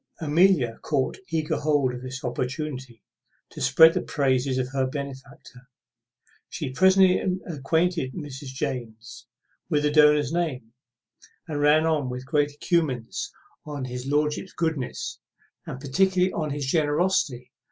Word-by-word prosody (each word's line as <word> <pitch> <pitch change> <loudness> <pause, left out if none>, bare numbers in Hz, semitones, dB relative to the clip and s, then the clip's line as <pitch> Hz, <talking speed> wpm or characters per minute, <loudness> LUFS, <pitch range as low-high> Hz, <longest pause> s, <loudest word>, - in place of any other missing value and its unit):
Amelia 155 -6 +3
caught 140 -4 -1
eager 160 -2 -1
hold 145 -4 +1
of 125 - -7
this 130 +1 -7
opportunity 130 -1 -4 0.5
to - - -9
spread 160 0 +7
the - - -1
praises 130 -2 0
of 130 -1 -1
her 135 -1 0
benefactor. 135 -1 -9 0.8
She 130 - -4
presently 190 +4 +5 0.3
acquainted 160 -1 -1
Mrs. 145 -4 -7
James 125 -5 -6 0.4
with 150 -1 +1
the 150 - +2
donor's 150 -1 +4
name, 130 -10 -2 0.7
and 150 -2 -3
ran 150 +2 +4
on 150 -5 0
with 125 +1 -6
great 145 +1 +1
encomiums 145 -6 -1 0.3
on 145 -3 -5
his 125 +1 -6
lordship's 150 +5 -1
goodness, 160 -6 -3 0.5
and 130 - -6
particularly 185 +6 +1
on 155 -2 -2
his 145 -1 -3
generosity. 150 -3 0
145 Hz, 130 wpm, -25 LUFS, 130-160 Hz, 0.8 s, spread